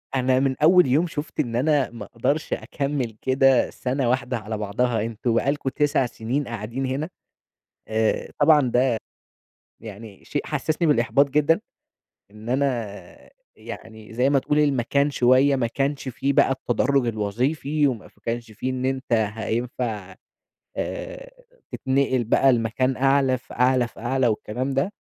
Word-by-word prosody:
أنا 130 0 +2
من 135 -1 +1
أول 180 -1 +6
يوم 155 +7 +2
شُفت 155 0 -6
إن 120 -6 -1
أنا 140 +1 +2
ما 120 - -8
أقدرش 145 +6 -1
أكمل 140 -6 -3
كده 130 0 +3
سنة 130 -1 -2
واحدة 125 -1 0
على 110 0 -5
بعضها، 110 +2 0
أنتم 115 +1 -2
بقى 130 +4 +2
لكم 145 -2 -2
9 145 -1 +1
سنين 125 +4 -3
قاعدين 115 +4 -4
هنا! 140 +6 -2 0.8
آآ، 110 0 0
طبعًا 150 0 +6
ده 125 -1 +2 0.8
يعني 110 -2 -11
شيء 145 - -3
حسسني 155 +3 -1
بالإحباط 140 +1 +3
جدًا، 150 +6 +3 0.7
إن 105 +2 -11
أنا 125 -6 -3 0.3
يعني 110 0 -10
زي 125 +4 +2
ما 140 - +4
تقول 150 +3 0
المكان 140 0 +2
شوية 130 +2 +4
ما 120 - 0
كانش 135 +3 -2
فيه 135 +2 -1
بقى - - +4
التدرج 130 0 +1
الوظيفي، 130 +8 0
وما 125 -6 -3
ف - - -29
كانش 115 +1 -4
في 125 +5 -3
إن 130 0 -3
أنت 130 -1 -2
هينفع، 110 -2 -2 0.6
آآ، - - -5 0.4
تتنقل 130 -2 0
بقى 135 +4 +4
لمكان 120 +3 0
أعلى 135 -1 +3
فأعلى 125 0 +1
فأعلى، 125 +3 -1
والكلام 120 +4 -2
ده، 140 +10 0
130 Hz, 145 wpm, -23 LUFS, 115-140 Hz, 0.8 s, أول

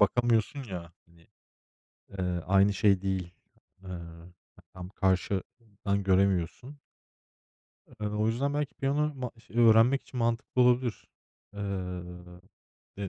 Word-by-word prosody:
bakamıyorsun 120 +5 +2
ya, 90 -6 -7
hani, 85 -1 -23 0.9
eee, 90 -1 -1
aynı 95 +2 +4
şey 100 -2 +3
değil. 95 -2 -2 0.5
Iıı, 85 -1 -9 0.4
tam 90 -1 -8
karşıdan 100 +2 -1
göremiyorsun. 95 - +1 1.2
Iıı, 105 0 -2
o 105 - +2
yüzden 135 +6 0
belki 145 -1 -2
piyano 145 +2 0
ma 125 -3 -4
ş 115 0 -19
ııı, 120 -1 +6
öğrenmek 115 +5 +5
için 130 - -8
mantıklı 115 +2 +1
olabilir. 125 -2 +1 0.5
Iıı, 90 -3 -6 0.6
eee, 100 - -4
100 Hz, 115 wpm, -29 LUFS, 90-120 Hz, 1.2 s, ııı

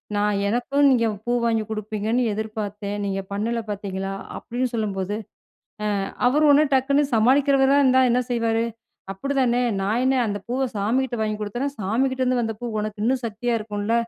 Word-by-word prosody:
நா 205 - +1 0.2
'எனக்குனு 245 +7 0
நீங்க 235 -3 +3 0.2
பூ 240 - -1
வாங்கி 225 -1 +1
குடுப்பீங்கன்னு 215 +2 -1
எதிர்பார்த்தேன். 210 -1 -4
நீங்க 195 0 -2
பண்ணல 225 +4 -1
பார்த்தீங்களா.' 195 -1 -4 0.2
அப்படின்னு 250 +2 -2
சொல்லும்போது, 205 -3 -2 0.9
அ - - -2 0.2
அவரு 290 +5 +3
ஒடனே 290 +2 +6
டக்குனு 280 +2 +3
சமாளிக்கிறவரா 270 +4 +4
இருந்தா 260 -1 +5
என்ன 240 +1 +3
செய்வாரு? 230 -1 +1 0.5
அப்படிதானே, 250 +2 +1 0.2
"நா 195 - -1
என்ன 265 +1 +3
அந்த 205 -1 -2
பூவ 260 +2 0
சாமிகிட்ட 240 +5 0
வாங்கி 215 -1 -1
குடுத்தேனா, 240 +7 -2
சாமிகிட்டேருந்து 255 +5 +1
வந்த 225 -2 -2
பூ - - -4
உனக்கு 210 0 -4
இன்னு 250 +4 +3
சக்தியா 230 +2 -2
இருக்கும்ல, 210 +1 -3
230 Hz, 150 wpm, -23 LUFS, 210-260 Hz, 0.9 s, ஒடனே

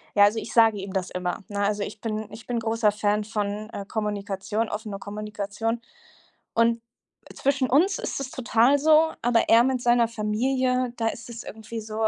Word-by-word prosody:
Ja, 205 - +7
also 215 +2 +2
ich 225 - -7
sage 225 -2 +5
ihm 195 0 -6
das 190 -1 -1
immer, 180 +2 -3
ne? 205 -1 -4
Also 205 0 0
ich 205 +1 -7
bin 215 -1 -3
ich 225 +3 -11
bin 240 -1 -1
großer 225 -1 +2
Fan 210 0 0
von, 210 0 -3
äh, 200 - -6
Kommunikation, 210 0 -2
offener 210 -2 -5
Kommunikation. 210 +2 -4 0.7
Und 230 0 +3 0.5
zwischen 270 -2 0
uns 360 +9 +3
ist - - -3
es 270 -1 -5
total 255 +3 +3
so, 315 +2 +5
aber 235 -1 +3
er 230 +1 +7
mit 260 -1 0
seiner 240 -1 +4
Familie, 250 +3 0
da 225 -1 0
ist 235 +1 -8
es 230 0 -7
irgendwie 220 +1 -7
so: 220 0 -1
225 Hz, 185 wpm, -25 LUFS, 210-240 Hz, 0.7 s, Ja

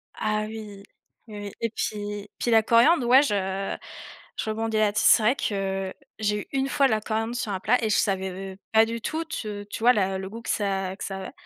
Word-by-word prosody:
Ah 215 0 -1
oui, 215 -2 -8 0.4
oui, 210 -1 -8
oui 200 - -6
et 230 - 0
puis 205 -2 -4
puis 240 - 0
la 225 -1 +6
coriandre, 240 +5 +5
ouais, 260 +3 +8
je 195 -4 -1 0.6
je 220 - -2
rebondis 220 0 -1
là 215 -1 +3
dess 210 - 0
c'est 220 - +6
vrai 245 +5 +4
que, 195 -5 -2 0.3
j'ai 210 -1 0
eu - - -10
une 270 +1 0
fois 285 -2 +3
de 260 - +3
la 215 -1 +1
coriandre 225 +2 -2
sur 220 -4 -2
un 190 - -2
plat 235 +5 +2
et 220 - +1
je 210 - +3
savais, 190 -2 0 0.2
heu, - - -16
pas 220 0 +6
du 230 0 -4
tout 320 +6 -2
t 210 -10 -5
tu - - -5
vois 245 +2 +6
le 190 -1 -1
goût 230 +2 -8
que - - -8
ça 195 -2 -1
que - - -8
ça 195 -1 -4
avait 190 - -7
215 Hz, 235 wpm, -25 LUFS, 200-230 Hz, 0.6 s, ouais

